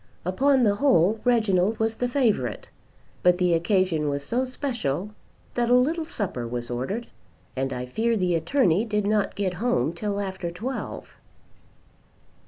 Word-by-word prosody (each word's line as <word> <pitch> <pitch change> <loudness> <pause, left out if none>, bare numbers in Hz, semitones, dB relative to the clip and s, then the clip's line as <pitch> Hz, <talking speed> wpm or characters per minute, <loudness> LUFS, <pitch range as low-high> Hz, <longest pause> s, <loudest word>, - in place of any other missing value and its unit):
Upon 265 +8 +3
the 205 -2 +3
whole 220 - +3
Reginald 220 -4 +2
was 220 0 0
the 245 - 0
favourite. 230 - 0 0.5
But 180 0 +4
the 180 -1 +2
occasion 170 -3 +1
was 140 0 -3
so 250 - 0
special 235 - -3 0.4
that 240 -1 0
a 245 - +6
little 315 +6 +2
supper 185 - -4
was 120 0 -5
ordered, 135 - -3 0.5
and 135 0 -1
I 125 -1 -4
fear 225 - 0
the 180 -3 +1
attorney 180 - +2
did 210 -3 -1
not 210 -1 +1
get 195 -3 -1
home 165 - +1
till 200 +3 -3
after 190 -3 -4
twelve. 225 +10 -6
200 Hz, 150 wpm, -25 LUFS, 170-240 Hz, 0.5 s, a